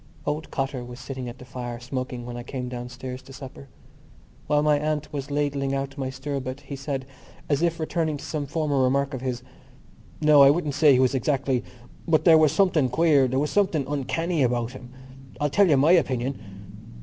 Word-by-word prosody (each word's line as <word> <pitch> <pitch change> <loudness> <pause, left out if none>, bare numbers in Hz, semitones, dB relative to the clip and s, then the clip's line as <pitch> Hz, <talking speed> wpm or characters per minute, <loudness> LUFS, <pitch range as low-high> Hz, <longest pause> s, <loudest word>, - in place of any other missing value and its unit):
Old 150 +2 -2
Cotter 135 -2 -3
was 120 +1 -9
sitting 130 -2 -6
at 120 - -10
the 125 - -12
fire, 120 -2 -6
smoking, 125 -1 -5
when 120 0 -6
I 120 - -5
came 125 +1 -5
downstairs 125 +1 -7
to 135 - -14
supper. 135 +1 -10 0.8
While 150 0 +2
my 150 -1 +3
aunt 150 0 -2
was 140 -1 -4
ladling 140 -1 -1
out 135 0 -3
my 135 -3 -3
stirabout 135 0 -5
he 140 - -7
said, 135 -1 -4 0.4
as 145 0 +1
if 170 0 +1
returning 160 -1 -1
to - - -9
some 150 -3 -3
former 145 -2 0
remark 135 +2 +1
of 130 - -4
his: 125 -2 -3 0.8
"No, 150 -2 +6
I 140 - +9
wouldn't 150 -1 +1
say 145 0 +5
he 125 - +4
was 130 0 +3
exactly... 135 -1 0 0.4
but 160 -2 +2
there 165 -3 +8
was 155 -2 +4
something 160 -6 +2
queer... 145 -1 +4
there 130 +1 -1
was 145 +2 0
something 185 -9 +1
uncanny 155 +4 -1
about 120 -2 +1
him. 125 -1 -11 0.5
I'll 145 -1 0
tell 200 +3 +4
you 145 - +5
my 145 +5 +5
opinion...." 135 -6 +1
140 Hz, 195 wpm, -25 LUFS, 130-150 Hz, 0.8 s, I